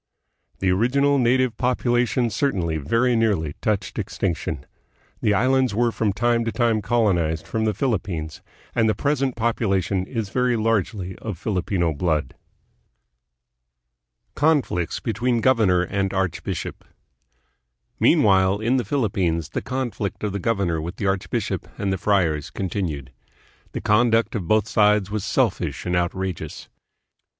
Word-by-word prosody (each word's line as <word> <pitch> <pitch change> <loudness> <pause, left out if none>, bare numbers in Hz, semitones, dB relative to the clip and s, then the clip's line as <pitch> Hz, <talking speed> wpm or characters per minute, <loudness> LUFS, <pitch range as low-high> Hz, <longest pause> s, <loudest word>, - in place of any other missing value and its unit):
The 95 -1 +1
original 140 +8 +2
native 125 -1 +2
population 125 -1 +1
certainly 95 - 0
very 115 - +1
nearly 100 -10 +1
touched 105 -3 -1
extinction. - - -3 0.6
The 105 - +2
islands 130 +1 +2
were 120 +1 +2
from 110 -2 0
time 120 +3 +1
to 115 - -1
time 115 -3 +1
colonized 90 -9 +1
from 110 -1 -1
the 110 - +1
Philippines, 90 - -2 0.3
and 115 -2 +2
the 110 - +1
present 135 0 0
population 100 -5 0
is 115 -5 -3
very 125 +2 +1
largely 105 -4 -1
of 105 -6 -6
Filipino 90 -3 -1
blood. 75 0 -1 2.0
Conflicts 140 - +1
between 120 +2 0
Governor 110 -8 +3
and 95 +1 -1
Archbishop. 95 -3 -3 1.2
Mean - - +4
while, 95 -1 +4
in 120 +4 +1
the 125 - 0
Philippines 90 - 0
the - - -3
conflict 120 -8 -3
of 105 - -1
the 100 - -3
governor 95 -6 0
with 85 +4 -5
the 100 - -4
archbishop 95 -1 -1
and 100 -1 -1
the 95 - -3
friars 90 -7 +1
continued. 85 -8 -4 0.6
The - - -4
conduct 115 +1 +3
of 95 -7 -3
both 110 +1 +3
sides 105 -2 +3
was 105 -2 -2
selfish 105 - 0
and 90 0 0
outrageous. 90 0 -3
105 Hz, 135 wpm, -23 LUFS, 90-120 Hz, 2.0 s, Mean